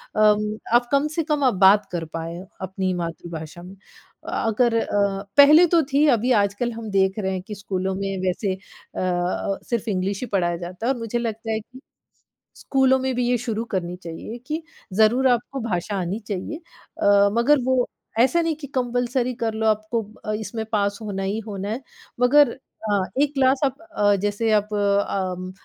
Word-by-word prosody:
अम, 210 0 +3 0.2
आप 240 0 +4
कम-से-कम 300 +1 +1
आप 255 -4 +4
बात 205 +1 +5
कर 170 -2 -3
पाएँ 165 +1 -5 0.2
अपनी 190 0 -2
मातृभाषा 165 0 -7
में। 185 +2 -11 0.5
अ - - -6 0.2
अगर 230 +1 +2
अ, 200 -2 0
पहले 300 +5 +9
तो 335 0 +4
थी 285 +3 +4
अभी 245 0 +2
आजकल 200 +4 -1
हम 225 -1 -7
देख 190 +1 +2
रहे 190 -2 -1
हैं 185 - -3
कि 210 - -6
स्कूलों 190 -1 -3
में 195 0 -3
वैसे 185 +1 0
अ 190 +2 -12
अ, 180 +2 -1
सिर्फ 235 -2 -1
इंग्लिश 195 -1 -1
ही 250 - -3
पढ़ाया 175 -2 +1
जाता 180 +5 -7
है 265 - +3
और 245 - -8
मुझे 230 +1 -2
लगता 225 -1 -3
है 220 - 0
कि 250 +4 -14 0.8
स्कूलों 265 -1 +2
में 260 0 -1
भी 245 0 0
ये 245 - +3
शुरू 230 -1 -3
करनी 180 -1 -2
चाहिए 170 +7 -7
कि 310 +2 -2 0.3
ज़रूर 220 +6 +4
आपको 250 +2 0
भाषा 185 +2 -2
आनी 180 +5 -3
चाहिए। 205 +9 -4 0.4
अ, 200 0 +5
मगर 285 +4 +4
वो 255 -1 +2 0.3
ऐसा 265 +8 +4
नहीं 330 -1 0
कि 290 -1 -9
कंपल्सरी 245 0 0
कर 225 -1 0
लो 220 0 0
आपको 215 +2 0 0.2
अ, 215 - -1
इसमें 220 0 -5
पास 200 -2 0
होना 200 -3 -4
ही 200 +3 -1
होना 200 -1 -4
है, 230 +5 -3 0.4
मगर 280 +4 +5 0.4
अ, 205 - +3 0.2
एक 290 0 +1
क्लास 265 -1 +3
आप 275 +3 -3
अ, 205 -12 +1
जैसे 205 +2 0
आप 210 0 +1
अम, 200 -3 0
215 Hz, 180 wpm, -23 LUFS, 195-250 Hz, 0.8 s, पहले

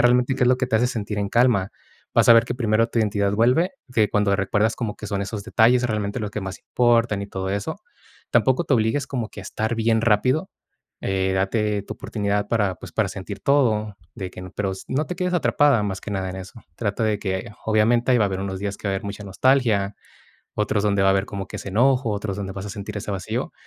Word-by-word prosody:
realmente, 125 +1 +3
¿qué 130 - +1
es - - +4
lo 125 - +4
que 130 - -1
te 115 - +2
hace 120 +3 +3
sentir 105 -4 -3
en 100 - -1
calma? 115 -5 +3 0.4
Vas - - +4
a - - +12
ver 115 0 +6
que 120 - -3
primero 115 -2 +1
tu 115 - -2
identidad 100 -2 +1
vuelve, 125 - +3 0.2
de 110 -4 +2
cuando 105 -1 +2
recuerdas 105 +3 +1
como 110 -4 -3
que 105 - -7
son 100 -1 -2
esos 100 +1 -4
detalles 120 +2 +4
realmente 105 0 -2
los 105 -2 -3
que 105 - -4
más 95 -1 -6
importan 115 -4 +2
y - - -5
todo 95 -1 -4
eso, 100 0 -3 0.5
tampoco 130 +6 +3
te 150 - -1
obligues 115 +5 +1
como 120 -5 -3
que - - -10
a - - -9
estar 110 +2 -2
bien 115 0 +2
rápido. 125 - +2 0.5
Eh, 95 0 0
date 105 +2 0
tu 105 - -7
oportunidad 105 -1 -2
para, 105 -5 +1
pues, - - -11
para - - +1
sentir 100 +1 -7
todo 110 -7 +2 0.2
de 95 -5 -5
que - - -10
n 90 0 -8
pero 100 -2 -1 0.2
no 145 +4 0
te 180 - -5
quedes 180 0 -1
atrapada 145 -8 +3
más 95 -2 -3
que - - -7
nada 95 -2 -2
en 95 - -7
eso. 95 +4 -10
Trata 105 -1 -2
de 105 -2 +1
que, 95 +4 -3 0.2
obviamente, 115 +3 +3
ahí 120 - +4
va 105 - +4
a - - +1
haber 95 - -3
unos 95 -1 -4
días 100 0 -3
que 100 - -4
va - - 0
a - - 0
haber 95 - -6
mucha 100 0 -6
nostalgia, 105 -2 +2 0.6
otros 105 -1 0
donde 100 -2 +2
va 95 - +4
a - - +6
haber 95 0 +1
como 100 -2 -5
que - - -7
ese - - -7
enojo, 125 +3 +3
otros 100 -1 -3
donde 100 -1 -4
vas 95 +1 -6
a - - -5
sentir 105 +1 -6
ese 100 - -6
vacío. 95 -2 -3
105 Hz, 245 wpm, -23 LUFS, 100-120 Hz, 0.6 s, a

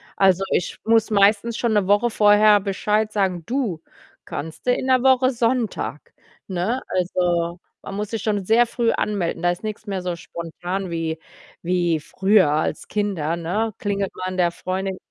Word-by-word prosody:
Also, 190 -1 +3
ich 175 - -1
muss 225 0 +3
meistens 210 +3 +3
schon 235 -2 0
'ne 205 -2 +2
Woche 205 +4 +3
vorher 210 -1 +5
Bescheid 210 +2 0
sagen: 190 -5 0
„Du, 235 - -2 0.4
kannst 160 +2 -7
du 250 - +4
in - - -2
'ner 255 -1 +3
Woche 260 -1 +4
Sonntag?“, 230 - -2 0.3
ne? 195 +8 -1
Also, 175 -1 0 0.2
man 195 - -7
muss 210 0 -3
sich 225 -3 -4
schon 205 -2 0
sehr 225 +5 +4
früh 235 0 0
anmelden. 200 -6 -2
Da 175 - +3
ist 175 - -6
nix 215 0 -5
mehr 195 -3 -3
so 180 -1 -3
spontan 175 +3 -5
wie 165 -1 -3 0.4
wie 175 -2 +1
früher 190 +2 +3
als 155 +1 -1
Kinder, 190 -7 -1
ne? 205 +7 -2
Klingelt 200 -1 -2
man 185 0 -4
der 175 -1 +3
Freundin 190 +2 -3
195 Hz, 165 wpm, -22 LUFS, 175-220 Hz, 0.4 s, vorher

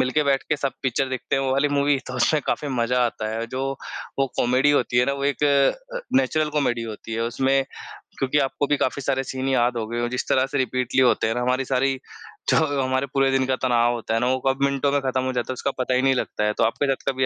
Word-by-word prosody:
मिल 130 - +1
के 150 +3 +2
बैठ 135 -1 +2
के 150 - +1
सब 140 -1 -2
पिक्चर 130 +1 0
देखते 130 +1 -2
हैं 135 - 0
वो 130 - 0
वाली 140 +2 +2
मूवी 145 0 +2
तो 125 - -6
उसमें 150 +5 +2
काफ़ी 145 - -1
मज़ा 125 -1 +1
आता 110 -2 -4
है। 115 +1 -3
जो 130 +3 -4 0.6
वो 135 - +3
कॉमेडी 130 +4 +3
होती 125 -3 +2
है 125 - +4
ना, 140 - +1
वो 140 0 -3
एक 145 +1 0
अ, - - +1 0.2
नेचुरल 155 - +1
कॉमेडी 135 -6 0
होती 110 0 -7
है 115 - -1
उसमें 135 +3 +1 0.6
क्योंकि 135 +2 +1
आपको 140 +1 0
भी 145 - +2
काफ़ी 140 +1 -1
सारे 135 +1 0
सीन 130 0 -4
याद 120 -2 +2
हो 110 - -2
गए 120 +1 -3
हों। 120 - 0
जिस 125 - -3
तरह 130 0 +3
से 145 - -1
रिपीटली 130 0 0
होते 120 -3 +3
हैं 115 - -1
ना 125 - -1
हमारी 125 +2 0
सारी 135 0 0 0.5
जो 140 -1 +2
हमारे 130 +1 0
पूरे 135 -1 +3
दिन 135 -1 +2
का 130 - +1
तनाव 120 -1 +3
होता 115 -1 -3
है 115 - +2
ना, 125 - +1
वो 130 +1 +1
कब 135 +1 +1
मिनटों 140 0 +1
में 145 - +2
खत्म 130 -1 -1
हो 130 - -2
जाता 125 0 -2
है, - - -1
उसका 135 +2 -2
पता 130 0 0
ही 130 - +3
नहीं 135 0 +4
लगता 105 - -2
है। 105 - +1
तो - - +2
आपके 115 +5 +1
साथ 135 - -3
कभी 130 0 0
130 Hz, 270 wpm, -23 LUFS, 125-140 Hz, 0.6 s, है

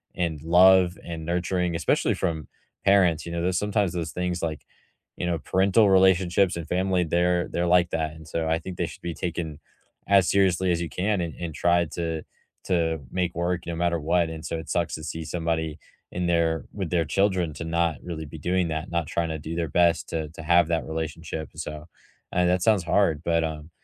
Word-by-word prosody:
and 80 -4 -2
love 90 +2 +5
and 80 -2 -6
nurturing, 90 0 -1
especially 80 - +1
from 80 -3 -2 0.4
parents, 90 -5 +4
you 85 - -6
know, 85 0 -2
there's 90 0 +1
sometimes 105 -3 0
those 80 -3 -3
things, 90 -1 -2
like, 80 -3 -3 0.5
you - - -3
know, 85 -2 0
parental 100 +4 +3
relationships 95 -1 +4
and 85 -2 -6
family, 90 0 +1
they're 90 +1 +1
they're 85 0 -1
like 90 -1 +4
that, 80 -1 -1
and 80 0 -13
so 80 +1 -2
I 80 0 +1
think 90 +1 -8
they 85 - 0
should - - -11
be 85 - -4
taken 80 -4 -4 0.5
as 95 -2 +5
seriously 95 -2 +3
as 85 0 0
you 85 - -3
can 100 +1 0
and 85 -2 -3
and 85 -3 -5
try 85 0 +3
to 80 -2 -3 0.4
to 80 -3 0
make 90 -2 -1
work 85 0 -1
no 85 -1 -4
matter 85 0 0
what, 85 +2 +1
and 80 0 -7
so 85 - -3
it 80 - -8
sucks 85 -2 0
to 80 - -8
see 80 +1 -5
somebody 80 -1 -2 0.3
in 90 0 -2
there 85 -1 +1
with 95 -5 -4
their 85 -2 +1
children 95 -5 +1
to 80 - -6
not 85 -2 0
really 80 -3 -5
be 75 +3 -9
doing 90 +3 0
that, 80 +3 -3
not 85 -3 -1
trying 85 -1 -1
to 80 -1 -4
do 80 +3 -6
their 85 -1 -1
best 85 0 +2
to 80 -2 -3
to 80 - -10
have 85 +1 +4
that 85 -1 0
relationship, 80 0 -5
and 75 - -11
so 75 0 -7 0.5
and 90 0 +2
that 90 0 +2
sounds 105 -6 +3
hard, 85 -3 +2
but, 85 -1 +2
um, 80 0 -5
85 Hz, 210 wpm, -25 LUFS, 80-90 Hz, 0.5 s, love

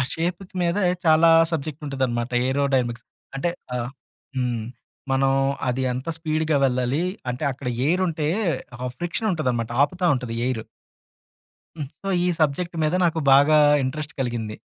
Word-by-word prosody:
షేప్‌కి 175 +3 -3
మీద 170 +1 +1 0.3
చాలా 160 +1 +6 0.2
సబ్జెక్ట్ 155 -1 -3
ఉంటదన్నమాట 125 -3 -1 0.2
ఏరోడైనమిక్స్ 130 -4 0 0.3
అంటే 155 +6 0 0.2
ఆహ్ 120 0 -2 0.5
హ్మ్. 125 -3 -1 0.5
మనం 135 0 +3 0.4
అది 125 +1 0
ఎంత 130 +5 -5
స్పీడ్‌గా 155 -1 0
వెళ్ళాలి? 125 +4 +1 0.3
అంటే 125 +4 -4
అక్కడ 130 0 -6 0.2
ఎయిరుంటే 165 -2 +1 0.6
ఆ - - -1
ఫ్రిక్షన్ 175 +6 -2
ఉంటదనమాట 125 -8 -1
ఆపుతా 180 +5 0
ఉంటది 125 -3 -4
ఎయిరు. 120 -4 -2 1.1
హ్మ్. 145 - -3 0.2
సో 195 - -4 0.2
ఈ - - +2
సబ్జెక్ట్ 165 +4 0
మీద 155 +3 +1
నాకు 165 -1 +1
బాగా 145 +3 +6 0.3
ఇంట్రెస్ట్ 150 +3 -4
కలిగింది. 115 -4 -3
140 Hz, 130 wpm, -23 LUFS, 125-160 Hz, 1.1 s, చాలా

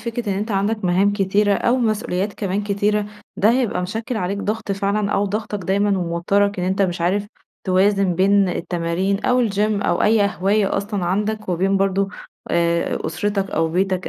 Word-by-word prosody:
فكرة 230 0 -4
إن 190 - -2
أنتَ 215 +2 -3
عندك 205 +1 -1
مهام 190 +3 +3
كتيرة 205 +1 +2
أو 240 +5 +1
مسئوليات 215 -4 -1
كمان 200 0 -2
كتيرة، 205 +1 0 0.3
ده 210 - +4
هيبقى 235 -7 0
مشكل 220 +5 -4
عليك 195 +1 -2
ضغط 210 0 -2
فعلًا 200 +1 -1
أو 205 - +1
ضاغطك 210 +1 -3
دايمًا 200 0 +1
وموتّرك 185 +4 0
إن - - -1
أنتَ 190 +1 +1
مش 175 -2 -1
عارف 200 +4 0 0.4
توازن 195 0 +2
بين 195 +1 +3
التمارين 175 +3 -2
أو 250 -2 +3
الgym 200 - -6 0.3
أو - - +1
أي 215 0 +4
هواية 200 +2 +1
أصلًا 200 -2 -2
عندك، 210 +3 -1
وبين 190 +3 +1
برضو 195 0 +1 0.4
آآ 170 0 +1
أسرتك 195 +4 -2
أو 160 0 0
بيتك 185 +2 -1
200 Hz, 170 wpm, -20 LUFS, 185-210 Hz, 0.4 s, ده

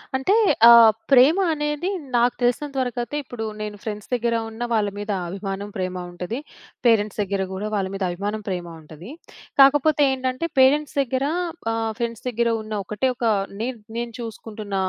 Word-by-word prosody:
అంటే 265 +9 +1 0.4
ఆహ్, 230 -1 +9 0.2
ప్రేమ 275 +7 +6 0.2
అనేది 295 +3 -2 0.3
నాకు 240 +1 +3
తెలిసినంత 270 +4 0
వరకైతే, 245 +2 -3
ఇప్పుడు 245 -3 -7 0.2
నేను 210 -1 -5
ఫ్రెండ్స్ 210 -2 -6
దగ్గర 235 -1 +1
ఉన్న 225 +2 -11
వాళ్ళ 210 -2 +2
మీద 205 0 -4 0.2
అభిమానం, 195 +2 -5
ప్రేమ 185 -1 -3 0.2
ఉంటది. 180 +8 -5 0.5
పేరెంట్స్ 215 -3 +2
దగ్గర 200 -1 -1
కూడా 200 +3 -4
వాళ్ళ 195 -2 0
మీద 195 - -3
అభిమానం, 205 +4 -4
ప్రేమ 175 -2 -3
ఉంటది. 155 +6 -12 0.5
కాకపోతే, 290 +2 +5
ఏంటంటే 260 +4 -2
పేరెంట్స్ 285 +3 +4
దగ్గర 265 +1 -1 0.5
ఆహ్, 225 -1 -1
ఫ్రెండ్స్ 235 -1 -4
దగ్గర 235 0 0
ఉన్న 215 0 -7
ఒకటే 210 +7 -1
ఒక 240 - -3 0.4
నే 240 - -1 0.3
నేను 235 0 -3
చూసుకుంటున్న 215 -3 -7
230 Hz, 155 wpm, -23 LUFS, 205-255 Hz, 0.5 s, ఆహ్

